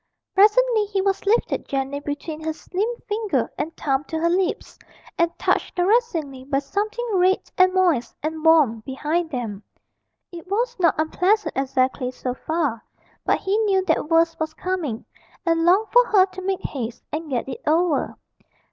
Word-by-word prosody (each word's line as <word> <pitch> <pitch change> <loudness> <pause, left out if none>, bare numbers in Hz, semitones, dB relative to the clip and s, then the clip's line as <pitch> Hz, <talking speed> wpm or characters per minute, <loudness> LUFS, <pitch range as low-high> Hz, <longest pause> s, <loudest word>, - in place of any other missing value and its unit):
Presently 435 +2 +4
he 400 -1 -2
was 390 0 -1
lifted 455 +4 +1
gently 275 +1 -2
between 290 +2 -5
her 315 0 -2
slim 380 +7 -3 0.2
finger 425 -1 -1
and 320 - -4
thumb 270 -1 0
to 320 - -4
her 335 +1 +1
lips, 370 +1 -1 0.4
and 340 -1 +2
touched - - 0
caressingly 355 - 0
by 275 +1 -1
something 425 +12 -2
red 375 0 +3 0.2
and 370 0 +5
moist 355 -10 +1
and 315 0 -3
warm 305 -9 +5
behind 300 +8 -2
them. 230 -8 -4 0.7
It 345 0 -10
was 470 +5 -1
not 335 -3 +3
unpleasant 360 +3 +1
exactly, 260 -1 0
so 255 0 -4
far, 295 -5 -2 0.4
but - - +2
he 390 +2 0
knew 390 -4 +2
that 300 - 0
worse 330 0 +3
was 315 0 -3
coming, 335 -11 -3 0.4
and 330 -1 +2
longed 385 +5 +4
for - - +8
her 380 -3 +5
to 375 0 -10
make 380 0 -2
haste 240 -4 -5
and 310 0 -4
get 255 -2 -2
it 260 - -6
over. 320 -1 +1
330 Hz, 165 wpm, -23 LUFS, 285-385 Hz, 0.7 s, for